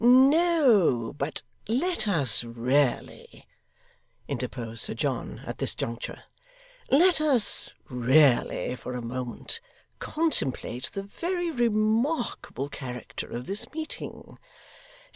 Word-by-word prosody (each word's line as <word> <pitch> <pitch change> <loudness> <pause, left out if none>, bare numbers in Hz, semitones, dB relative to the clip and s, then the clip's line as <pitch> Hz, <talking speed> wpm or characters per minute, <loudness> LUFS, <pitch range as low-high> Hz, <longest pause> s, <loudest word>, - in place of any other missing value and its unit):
'No, 255 - +5
but 140 +3 -3 0.2
let 255 - 0
us 140 - +2
really,' 120 +3 -1 0.8
interposed 115 -3 -3
Sir - - +1
John - - -3
at - - -6
this - - 0
juncture, 115 0 -5 0.7
'let 340 +4 +5
us 270 -8 +3 0.2
really, 125 0 +3
for 125 - -7
a 125 - -3
moment, 125 - -4 0.4
contemplate 140 - -1
the 195 - -4
very 345 - -3
remarkable 230 - 0
character 125 -4 -7
of 120 +1 -5
this 200 +7 0
meeting. 315 0 -7
195 Hz, 100 wpm, -27 LUFS, -, 0.8 s, No